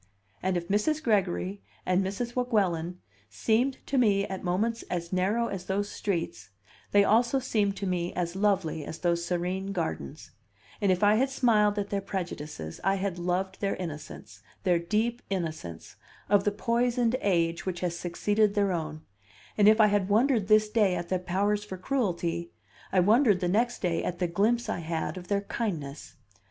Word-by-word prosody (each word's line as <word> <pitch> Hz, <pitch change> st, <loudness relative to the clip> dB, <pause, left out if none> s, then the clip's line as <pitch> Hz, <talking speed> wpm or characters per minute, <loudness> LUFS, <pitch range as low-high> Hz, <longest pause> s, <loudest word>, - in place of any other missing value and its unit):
And 185 Hz, -1 st, 0 dB
if 170 Hz, -1 st, -4 dB
Mrs. 300 Hz, -, +1 dB
Gregory 100 Hz, -, 0 dB, 0.2 s
and 185 Hz, +1 st, +2 dB
Mrs. 235 Hz, +6 st, -3 dB
Weguelin 185 Hz, -9 st, 0 dB, 0.3 s
seemed 225 Hz, -, +1 dB
to 270 Hz, -, +1 dB
me 200 Hz, -4 st, +3 dB
at 190 Hz, -1 st, -6 dB
moments 215 Hz, +6 st, 0 dB
as 170 Hz, 0 st, -3 dB
narrow 200 Hz, +6 st, +1 dB
as 195 Hz, -5 st, -5 dB
those 200 Hz, +2 st, -1 dB
streets, 170 Hz, -, -3 dB, 0.4 s
they 205 Hz, 0 st, +6 dB
also 235 Hz, +6 st, +3 dB
seemed 210 Hz, -6 st, 0 dB
to 200 Hz, -, -3 dB
me 180 Hz, -2 st, -1 dB
as 175 Hz, 0 st, -2 dB
lovely 190 Hz, -6 st, +1 dB
as 160 Hz, -, -7 dB
those 170 Hz, -1 st, 0 dB
serene 180 Hz, +3 st, -2 dB
gardens; 160 Hz, -, -4 dB, 0.5 s
and 200 Hz, -2 st, +3 dB
if 185 Hz, +2 st, +1 dB
I 205 Hz, +1 st, +5 dB
had 265 Hz, +3 st, +2 dB
smiled 215 Hz, -6 st, +3 dB
at 200 Hz, 0 st, -2 dB
their 200 Hz, -1 st, 0 dB
prejudices, 155 Hz, -, -5 dB
I 195 Hz, +1 st, +3 dB
had 190 Hz, -2 st, -2 dB
loved 185 Hz, +2 st, -2 dB
their 200 Hz, -1 st, 0 dB
innocence, 160 Hz, -5 st, -8 dB, 0.2 s
their 180 Hz, -3 st, +3 dB
deep 220 Hz, +7 st, -1 dB
innocence, 160 Hz, -, -5 dB, 0.3 s
of 200 Hz, -1 st, +4 dB
the 205 Hz, -, +3 dB
poisoned 240 Hz, +2 st, +1 dB
age 170 Hz, -3 st, +1 dB
which 180 Hz, -2 st, -3 dB
has 175 Hz, -2 st, -1 dB
succeeded 205 Hz, +5 st, +1 dB
their 200 Hz, -2 st, +2 dB
own; 155 Hz, -3 st, -3 dB, 0.5 s
and 205 Hz, -1 st, +5 dB
if 215 Hz, +1 st, +5 dB
I 215 Hz, -, +8 dB
had 205 Hz, -2 st, +1 dB
wondered 225 Hz, -1 st, +3 dB
this 215 Hz, 0 st, +5 dB
day 210 Hz, -4 st, +2 dB
at 175 Hz, -1 st, -4 dB
their 185 Hz, -, +1 dB
powers 200 Hz, +4 st, 0 dB
for 190 Hz, -3 st, -7 dB
cruelty, 175 Hz, -7 st, -1 dB, 0.4 s
I 190 Hz, -, +3 dB
wondered 210 Hz, +1 st, +4 dB
the 180 Hz, -, 0 dB
next 230 Hz, +6 st, 0 dB
day 170 Hz, -2 st, 0 dB
at 175 Hz, -, -3 dB
the 180 Hz, -, 0 dB
glimpse 215 Hz, +8 st, +1 dB
I -, -, -2 dB
had 165 Hz, +1 st, -3 dB
of 180 Hz, -1 st, -8 dB
their 200 Hz, 0 st, +1 dB
kindness. 165 Hz, -10 st, -4 dB
195 Hz, 175 wpm, -28 LUFS, 175-215 Hz, 0.5 s, I